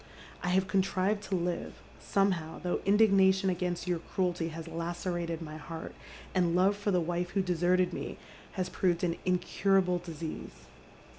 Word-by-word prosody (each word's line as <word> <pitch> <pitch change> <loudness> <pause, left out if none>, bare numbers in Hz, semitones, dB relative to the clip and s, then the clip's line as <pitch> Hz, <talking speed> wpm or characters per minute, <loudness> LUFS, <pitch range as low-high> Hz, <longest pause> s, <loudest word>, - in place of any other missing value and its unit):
I 180 - -1
have 190 +1 +3
contnvea 195 +2 +1
to 195 - +1
live, 175 0 -2 0.2
somehow, 185 -5 0
thougli 175 0 -1
indignation 195 -2 +5
against 180 -1 -2
your 175 -2 0
cruelty 175 -1 -1
has 165 0 -7
lacerated 170 0 -3
my 155 0 -7
heaii, 160 +2 -7 0.4
and 175 -2 +2
love 190 +3 +4
for 205 0 -2
the 180 -3 +3
wife 175 +1 -1
who 195 0 0
deserted 180 0 +2
me - - -5 0.4
has 185 -2 -1
proved 180 -2 0
an 170 -1 +1
incurahle 180 0 +2
disease. 165 -2 -7
180 Hz, 150 wpm, -31 LUFS, 170-190 Hz, 0.4 s, indignation